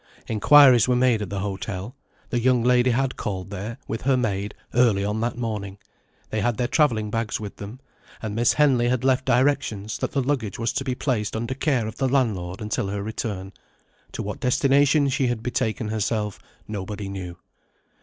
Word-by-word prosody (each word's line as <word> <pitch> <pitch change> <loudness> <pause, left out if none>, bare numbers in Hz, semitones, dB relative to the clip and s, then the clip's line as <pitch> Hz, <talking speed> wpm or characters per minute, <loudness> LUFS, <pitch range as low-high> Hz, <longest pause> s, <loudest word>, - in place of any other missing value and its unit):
Inquiries 130 +1 +6
were 125 - +3
made 125 -3 +3
at 100 - -4
the 100 0 -3
hotel. 100 +3 -5 0.4
The 120 - +1
young 125 0 +3
lady 125 0 +4
had 130 +2 0
called 95 -1 -4
there, 105 +4 -5
with 115 - -4
her 135 0 +2
maid, 105 -4 -2 0.2
early 115 -5 +3
on 105 +2 -1
that 120 +1 -2
morning. 105 -5 -4 0.5
They 110 - -1
had 120 +1 0
their 125 -1 0
travelling 115 -8 +1
bags 115 -1 -2
with 105 -2 -7
them; 105 +5 -8 0.4
and 110 -2 -5
Miss 115 +2 +3
Henley 135 -5 +3
had 125 0 0
left 130 -1 +2
directions 125 -5 +1
that - - -3
the 135 -2 +1
luggage 125 -7 -1
was 115 0 -1
to - - -1
be 130 -2 -2
placed 115 -7 -1
under 115 +3 -2
care 135 -4 0
of 110 - -6
the 135 -1 +1
landlord 105 -9 0
until 105 -1 -2
her 100 0 -3
return. 100 -3 -4 0.6
To - - -4
what - - -5
destination 140 +3 +3
she 135 -1 +1
had 120 -2 -2
betaken 115 -2 -1
herself 105 -1 -2 0.3
nobody 100 -1 -5
knew. 90 -3 -6
115 Hz, 185 wpm, -24 LUFS, 105-130 Hz, 0.6 s, Inquiries